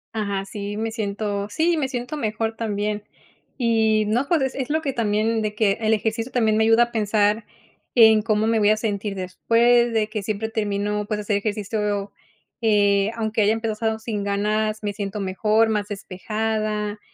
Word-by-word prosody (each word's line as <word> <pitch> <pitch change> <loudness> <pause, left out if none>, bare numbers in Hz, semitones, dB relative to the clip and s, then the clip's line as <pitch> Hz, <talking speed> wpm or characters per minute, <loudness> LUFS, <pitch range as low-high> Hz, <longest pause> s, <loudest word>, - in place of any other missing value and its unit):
Ajá, 200 -3 -2
sí 205 +1 -6
me 225 +1 -2
siento 205 -2 -3
sí, 330 +10 +1
me 290 -4 0
siento 255 +3 -4
mejor 225 -2 -2
también. 210 -1 -2 0.5
Y 220 -3 +2
no, 240 +6 0
pues 320 -4 +2
es 265 - -1
es 265 0 -3
lo 315 +1 +1
que 275 -2 -1
también 220 0 0
de 210 0 -3
que 210 -1 +1
el 220 0 +2
ejercicio 225 +3 -2
también 220 -3 +2
me 220 - +3
ayuda 225 +1 +5
a 235 - -4
pensar 210 0 +1 0.5
en 220 -2 +7
cómo 215 -1 +1
me 225 0 +2
voy 205 0 +4
a 215 - +4
sentir 205 -2 -2
después, 235 +6 +2
de 215 -1 0
que 215 -2 -3
siempre 215 +2 -3
termino, 210 -1 -1
pues, 210 0 -3
hacer 205 0 0
ejercicio, 205 -1 -2 0.5
eh, 205 -2 +3
aunque 220 -1 -1
haya 210 +1 +4
empezado 220 0 -2
sin 215 -3 -3
ganas, 215 +2 -1
me 205 -1 -2
siento 200 +1 -4
mejor, 215 +4 +2
más 210 -1 -1
despejada, 210 +1 -3
215 Hz, 180 wpm, -23 LUFS, 205-225 Hz, 0.5 s, en